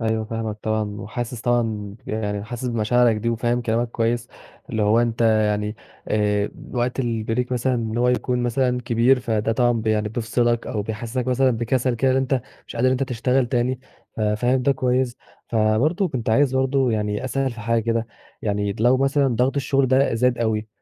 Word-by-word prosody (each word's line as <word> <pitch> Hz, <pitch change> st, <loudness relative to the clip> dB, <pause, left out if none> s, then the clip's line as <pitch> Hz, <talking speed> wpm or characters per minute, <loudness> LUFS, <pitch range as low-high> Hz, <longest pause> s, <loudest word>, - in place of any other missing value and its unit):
أيوه، 110 Hz, -1 st, 0 dB
فاهمك 110 Hz, -1 st, -4 dB
طبعًا، 110 Hz, -2 st, -2 dB
وحاسس 120 Hz, +2 st, -5 dB
طبعًا 120 Hz, 0 st, +2 dB, 0.4 s
ب -, -, -10 dB
يعني 105 Hz, -2 st, -2 dB
حاسس 120 Hz, +3 st, -5 dB
بمشاعرك 115 Hz, 0 st, +2 dB
دي 115 Hz, +2 st, -2 dB
وفاهم 120 Hz, +1 st, 0 dB
كلامك 115 Hz, +1 st, 0 dB
كويّس، 120 Hz, +1 st, -1 dB, 0.4 s
اللي 110 Hz, -1 st, 0 dB
هو 105 Hz, +3 st, +4 dB
أنت 115 Hz, -1 st, -1 dB
يعني، 105 Hz, -1 st, +2 dB, 0.3 s
آآ، 105 Hz, -1 st, +1 dB, 0.2 s
وقت 125 Hz, +1 st, -1 dB
البريك 115 Hz, +1 st, -1 dB
مثلًا، 125 Hz, +1 st, +1 dB
إن 115 Hz, -1 st, -2 dB
هو 125 Hz, +1 st, +3 dB
يكون 125 Hz, 0 st, 0 dB
مثلًا 125 Hz, 0 st, +1 dB
كبير، 120 Hz, +2 st, +3 dB
فده 110 Hz, -1 st, 0 dB
طبعًا 120 Hz, -1 st, +2 dB
يعني 105 Hz, -1 st, +1 dB
بيفصِلك 120 Hz, +1 st, 0 dB
أو 105 Hz, -4 st, -2 dB
بيحسِّسك 115 Hz, +4 st, -4 dB
مثلًا 130 Hz, +1 st, +3 dB
بكسل 120 Hz, +2 st, 0 dB
كده 130 Hz, +3 st, +2 dB
إن 130 Hz, -, +2 dB
أنت 135 Hz, -1 st, +1 dB, 0.3 s
مش -, -, -9 dB
قادر 125 Hz, +2 st, +2 dB
إن 130 Hz, -, +3 dB
أنت 130 Hz, +1 st, 0 dB
تشتغل 125 Hz, 0 st, +1 dB
تاني، 125 Hz, +1 st, 0 dB, 0.4 s
ف 110 Hz, -, -4 dB
فاهم 120 Hz, +5 st, +1 dB
ده 140 Hz, -, +3 dB
كويّس. 125 Hz, -1 st, 0 dB, 0.3 s
فبرضه، 120 Hz, -, +2 dB
كنت 115 Hz, -4 st, -2 dB
عايز 135 Hz, +2 st, +3 dB
برضه 130 Hz, -1 st, +2 dB
يعني 105 Hz, +1 st, -1 dB
أسأل 135 Hz, +1 st, -1 dB
في 120 Hz, -, -9 dB
حاجة 115 Hz, 0 st, +1 dB
كده، 115 Hz, 0 st, 0 dB, 0.4 s
يعني 100 Hz, -1 st, -1 dB
لو 125 Hz, +3 st, +5 dB
مثلًا 135 Hz, +1 st, +2 dB
ضغط 130 Hz, +3 st, +1 dB
الشغل 135 Hz, 0 st, +1 dB
ده 130 Hz, -1 st, +3 dB
زاد 125 Hz, +1 st, +2 dB
أوي، 110 Hz, -2 st, -1 dB
120 Hz, 185 wpm, -22 LUFS, 110-125 Hz, 0.4 s, لو